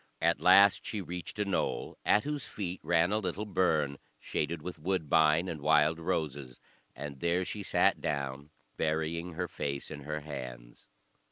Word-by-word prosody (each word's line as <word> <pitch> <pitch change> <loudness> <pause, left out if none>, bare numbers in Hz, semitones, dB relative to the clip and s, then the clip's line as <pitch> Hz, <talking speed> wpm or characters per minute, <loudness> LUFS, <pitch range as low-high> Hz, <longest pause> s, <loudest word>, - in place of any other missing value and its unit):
At 85 +1 +2
last 95 +2 +6
she 110 - -4
reached 90 0 -6
a 105 - 0
knoll, 100 - -1
at 105 - +4
whose 145 -4 -3
feet 95 -5 -5
ran 85 +2 +2
a 105 - +2
little 100 +1 -3
burn, 80 -8 +1 0.2
shaded 75 +1 -2
with 90 -2 -6
woodbine 80 -1 +2
and 80 -4 -5
wild 75 +2 +4
roses; 75 -7 -3 0.4
and 70 0 -7
there 85 +3 +1
she 105 - -5
sat - - +2
down, 70 0 -3 0.3
burying 80 +2 -1
her 90 +2 -2
face 70 -2 -4
in 75 - -6
her 75 +2 -4
hands. 65 -5 -8
80 Hz, 160 wpm, -31 LUFS, 75-90 Hz, 0.4 s, last